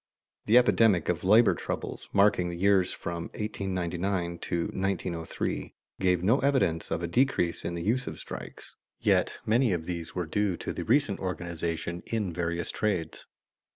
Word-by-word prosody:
The 110 +3 +6
epidemic 115 -7 +4
of 90 - -1
labor 110 +5 +6
troubles, - - -5
marking 100 -3 +3
the 85 - -5
years 95 0 +3
from 85 -1 -5
1899 95 -3 -2
to 85 -1 -2
1903, 90 -3 -3 0.2
gave 90 -2 +2
no 115 +9 +4
evidence 130 -13 +1
of 85 - -2
a - - 0
decrease 90 -4 +1
in 85 - -3
the 85 - -4
use 125 +6 0
of - - -5
strikes, - - -9 0.2
yet - - +2
many 115 0 +3
of 80 -2 -3
these 85 -2 -5
were 90 -2 -1
due 95 +2 0
to - - -4
the - - -5
recent 140 -9 +2
organization 85 -1 -3
in 105 -6 -2
various 85 0 -2
trades. 95 -7 -2
90 Hz, 155 wpm, -28 LUFS, 85-105 Hz, 0.2 s, The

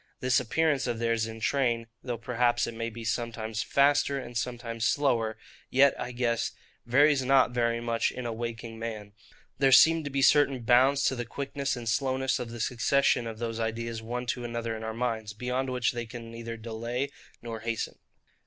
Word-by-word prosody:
This 125 -1 +3
appearance 150 +2 +1
of 120 -2 -1
theirs 115 -1 0
in 115 0 -8
train, 120 -2 +1 0.2
though 120 -2 -4
perhaps 120 0 +1
it 115 - -5
may 115 0 -3
be 115 0 -9
sometimes 110 0 -2
faster 140 +2 +3
and 125 -2 -7
sometimes 115 -1 -3
slower, 115 -7 +1 0.3
yet, 135 +1 +5
I 125 - -4
guess, 120 -1 -1 0.3
varies 140 +2 +4
not 130 -1 +4
very 115 -1 +1
much 115 -1 0
in 125 - -6
a 115 - -2
waking 115 0 -6
man: 110 -3 -6 0.5
there 135 -1 +4
seem 160 +4 +7
to 145 - -4
be 135 0 0
certain 140 -3 +4
bounds 130 +4 +4
to 130 - +2
the 120 - -3
quickness 140 +3 -3
and 120 -2 -7
slowness 130 +2 +1
of 125 -2 -5
the 120 0 -8
succession 120 +1 +2
of 110 -1 -6
those 115 0 -3
ideas 115 0 -3
one 120 +2 -4
to 120 0 -2
another 115 -1 -3
in 110 - -7
our 110 0 -4
minds, 115 -3 -2
beyond 125 +4 -2
which 125 -2 +1
they 120 -1 -5
can 115 0 -9
neither 115 0 -6
delay 115 +4 -3 0.3
nor 115 -1 -5
hasten. 115 0 -3
120 Hz, 190 wpm, -28 LUFS, 115-130 Hz, 0.5 s, seem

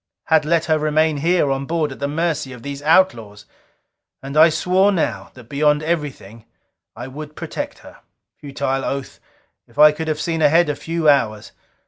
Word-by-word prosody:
Had 160 -2 +3
let 165 +1 +1
her 155 -1 +1
remain 155 0 +1
here 165 -1 +1
on 135 0 -3
board 160 -3 -1
at 135 - -10
the 140 - -2
mercy 150 -3 -2
of 125 - -12
these 140 0 -6
outlaws. 120 - +1 0.8
And 135 +1 -7
I 160 +2 +7
swore 180 +5 +2
now, 175 -5 -2
that 125 - -13
beyond 150 +2 +1
everything, 140 - -4 0.5
I 120 - -7
would 150 +3 -9
protect - - -6
her. - - -14 0.4
Futile 135 -1 -3
oath! 135 -1 -5 0.5
If - - -24
I 150 0 +8
could 160 +1 -6
have 155 -1 -2
seen 165 0 -2
ahead 165 +2 +4
a 145 - -1
few 165 +1 -3
hours! 110 -8 +2
150 Hz, 175 wpm, -20 LUFS, 140-160 Hz, 0.8 s, I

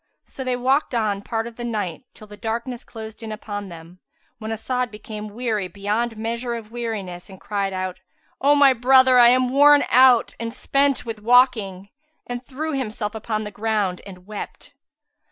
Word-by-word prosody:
So 265 - -8
they 255 -1 0
walked 260 +2 +1
on 210 -3 0
part 225 +1 -3
of 235 -1 -9
the 240 - -6
night, 210 -4 -3
till 215 - -13
the 210 0 -12
darkness 235 +3 -4
closed 220 -1 -10
in 225 -1 -6
upon 205 -2 -6
them, 170 +1 -12 0.4
when 220 - -6
As'ad 250 +3 -2
became 210 0 -8
weary 225 -5 -1
beyond 210 +5 -2
measure 235 +2 -3
of 225 -2 -8
weariness 210 -7 -5
and 190 -1 -12
cried 200 -2 -2
out, 185 -1 -4 0.4
"O 285 +2 +5
my 280 -2 +6
brother, 260 +1 +5
I 240 0 +8
am 255 0 +3
worn 290 +1 +6
out 255 -2 +6
and 230 0 -5
spent 275 -1 +1
with 225 -2 -5
walking," 215 -5 +3 0.4
and 245 0 -5
threw 300 +5 -4
himself 220 -5 -3
upon 220 0 -3
the 210 - -6
ground 205 -4 -1
and 180 -2 -12
wept. 210 0 -8
225 Hz, 175 wpm, -22 LUFS, 210-250 Hz, 0.4 s, I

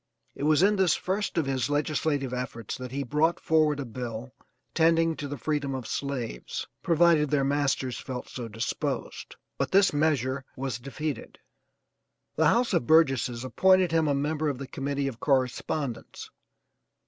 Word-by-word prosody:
It 140 - -4
was 155 +3 +4
in 205 +1 +4
this 185 -4 +3
first 195 +1 -2
of 160 - +2
his 130 -2 -1
legislative 145 -2 0
efforts 125 -3 -4
that 125 -2 -7
he 140 +1 -2
brought 150 +6 +1
forward 155 -2 +2
a 140 - -3
bill 120 +1 -6 0.4
tending 165 0 +3
to 145 - -4
the 145 +1 -5
freedom 140 0 -2
of 130 -3 -5
slaves, 125 - -4 0.2
provided 165 -3 +4
their 140 -1 +2
masters 135 -2 0
felt 125 -1 -6
so 120 -2 -6
disposed, 115 +1 -4 0.2
but - - 0
this 195 -2 +4
measure 140 -3 +1
was 130 -4 -3
defeated. 140 +3 -5 1.0
The 160 - +3
house 235 +9 +2
of 120 - +1
Burgesses 135 -6 +3
appointed 185 +5 +4
him 165 -1 +2
a 145 - +2
member 150 +2 0
of 140 - -3
the 140 - -6
committee 140 +1 -2
of 120 -4 -5
correspondence. 130 -1 -2
140 Hz, 160 wpm, -27 LUFS, 130-160 Hz, 1.0 s, was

